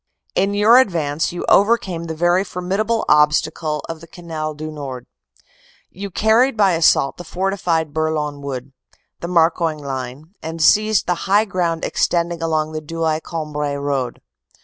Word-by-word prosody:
"In 200 Hz, +1 st, +1 dB
your 220 Hz, +4 st, +6 dB
advance 160 Hz, -, 0 dB
you 175 Hz, -, -5 dB
overcame 195 Hz, -5 st, +2 dB
the 160 Hz, -1 st, -5 dB
very 175 Hz, +3 st, +2 dB
formidable 200 Hz, +5 st, -2 dB
ob 150 Hz, 0 st, +5 dB
stacle 155 Hz, -1 st, -1 dB
of 165 Hz, -1 st, -7 dB
the 165 Hz, -, -12 dB
Canal 160 Hz, -3 st, -6 dB
du 155 Hz, +1 st, -6 dB
Nord; 135 Hz, -5 st, -7 dB, 0.9 s
you 200 Hz, +2 st, -7 dB
carried 225 Hz, +6 st, +2 dB
by 200 Hz, -3 st, +4 dB
assault 160 Hz, -4 st, +3 dB
the 175 Hz, -, -8 dB
forti 190 Hz, +3 st, -2 dB
fied 160 Hz, -4 st, -1 dB
Bourlon 155 Hz, -2 st, -2 dB
Wood, 135 Hz, -1 st, -6 dB, 0.5 s
the 170 Hz, -, -5 dB
Marcoing 165 Hz, -2 st, +2 dB
line, 135 Hz, +3 st, -6 dB
and 160 Hz, +1 st, -6 dB
seized 215 Hz, +5 st, +4 dB
the 180 Hz, +1 st, -2 dB
high 205 Hz, +3 st, +4 dB
ground 175 Hz, -4 st, -1 dB
extending 170 Hz, -1 st, 0 dB
along 155 Hz, -1 st, 0 dB
the 155 Hz, 0 st, -4 dB
Douai 160 Hz, 0 st, -1 dB
Cambrai 150 Hz, -3 st, -4 dB
road. 140 Hz, -3 st, -2 dB
165 Hz, 155 wpm, -20 LUFS, 150-185 Hz, 0.9 s, your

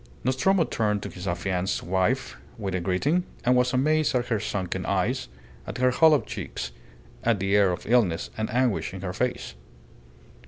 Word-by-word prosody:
Nostromo 150 Hz, +9 st, +3 dB
turned 105 Hz, -7 st, -1 dB
to 100 Hz, -, -5 dB
his 90 Hz, +1 st, -8 dB
affianced 95 Hz, +1 st, -1 dB
wife 95 Hz, +1 st, 0 dB, 0.2 s
with 100 Hz, -3 st, -3 dB
a 90 Hz, -, 0 dB
greeting, 95 Hz, -, +1 dB, 0.2 s
and 125 Hz, +1 st, +4 dB
was 125 Hz, 0 st, +3 dB
amazed 150 Hz, +3 st, +2 dB
at 125 Hz, 0 st, 0 dB
her 115 Hz, -3 st, +1 dB
sunken 95 Hz, -3 st, -3 dB
eyes, -, -, 0 dB, 0.4 s
at -, -, -5 dB
her 130 Hz, 0 st, +3 dB
hollow 155 Hz, +2 st, +5 dB
cheeks, -, -, -6 dB, 0.5 s
at 115 Hz, -3 st, +2 dB
the 95 Hz, +1 st, +1 dB
air 100 Hz, -2 st, +5 dB
of 90 Hz, -, -5 dB
illness 110 Hz, -8 st, +2 dB
and 110 Hz, 0 st, -2 dB
anguish 120 Hz, -6 st, 0 dB
in 95 Hz, -, -7 dB
her 90 Hz, -2 st, -4 dB
face. 125 Hz, +4 st, -2 dB
110 Hz, 170 wpm, -26 LUFS, 95-125 Hz, 0.5 s, hollow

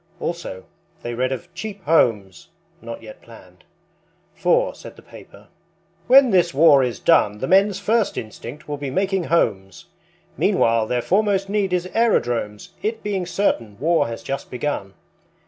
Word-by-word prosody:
Also, 170 Hz, -, -5 dB, 0.4 s
they 120 Hz, -, -4 dB
read 130 Hz, +2 st, -1 dB
of 175 Hz, +6 st, -6 dB
Cheap 200 Hz, +1 st, -7 dB
Homes, 110 Hz, -, +1 dB, 0.3 s
not 115 Hz, 0 st, -8 dB
yet 110 Hz, -1 st, -12 dB
planned; 90 Hz, -6 st, -17 dB, 0.7 s
For, -, -, +1 dB
said -, -, -12 dB
the -, -, -17 dB
paper, -, -, -15 dB, 0.6 s
"When 260 Hz, 0 st, +6 dB
this 175 Hz, -5 st, +2 dB
war 145 Hz, -2 st, +6 dB
is 125 Hz, -2 st, -3 dB
done 105 Hz, -11 st, +3 dB
The 130 Hz, -, -4 dB
men's 195 Hz, +2 st, +3 dB
first 225 Hz, -1 st, 0 dB
instinct 115 Hz, +5 st, -8 dB
will 145 Hz, -1 st, -4 dB
be 140 Hz, -1 st, -5 dB
making 190 Hz, +4 st, -1 dB
homes. 95 Hz, -, -1 dB, 0.5 s
Meanwhile 115 Hz, -1 st, +2 dB
their 125 Hz, 0 st, -1 dB
foremost 195 Hz, 0 st, +1 dB
need 200 Hz, -2 st, 0 dB
is 180 Hz, -1 st, 0 dB
aerodromes, 120 Hz, -, 0 dB
It 220 Hz, +1 st, -3 dB
being 195 Hz, -4 st, -2 dB
certain 145 Hz, -, -1 dB
war 165 Hz, -1 st, +2 dB
has 115 Hz, 0 st, -7 dB
just 135 Hz, -, -5 dB
begun. 120 Hz, -7 st, -4 dB
145 Hz, 150 wpm, -21 LUFS, 115-195 Hz, 0.7 s, When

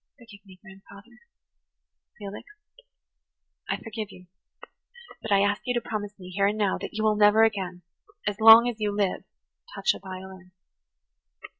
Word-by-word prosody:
Forgive 215 Hz, -4 st, -16 dB
me, 185 Hz, -1 st, -16 dB
grandfather." 200 Hz, +4 st, -16 dB, 1.0 s
"Felix, 205 Hz, -, -9 dB, 1.2 s
I -, -, -1 dB
forgive 220 Hz, -2 st, -7 dB
you, 180 Hz, -, -15 dB, 1.0 s
but 220 Hz, -, -7 dB
I 200 Hz, -1 st, +4 dB
ask 205 Hz, +1 st, 0 dB
you 245 Hz, -, -1 dB
to 240 Hz, -, -3 dB
promise 210 Hz, -1 st, -5 dB
me, 185 Hz, -2 st, -11 dB
here 200 Hz, +2 st, +1 dB
and 210 Hz, +1 st, -1 dB
now, 205 Hz, -3 st, 0 dB
that -, -, -8 dB
you 215 Hz, -, -2 dB
will 215 Hz, -1 st, +3 dB
never 210 Hz, +1 st, +5 dB
again, 190 Hz, -5 st, -1 dB, 0.4 s
as 205 Hz, 0 st, -2 dB
long 225 Hz, +2 st, +9 dB
as 235 Hz, -2 st, -4 dB
you 210 Hz, -1 st, -1 dB
live, 200 Hz, -2 st, -2 dB, 0.5 s
touch 480 Hz, -, +1 dB
a -, -, -10 dB
violin." 185 Hz, -1 st, -10 dB
205 Hz, 155 wpm, -26 LUFS, 195-220 Hz, 1.2 s, long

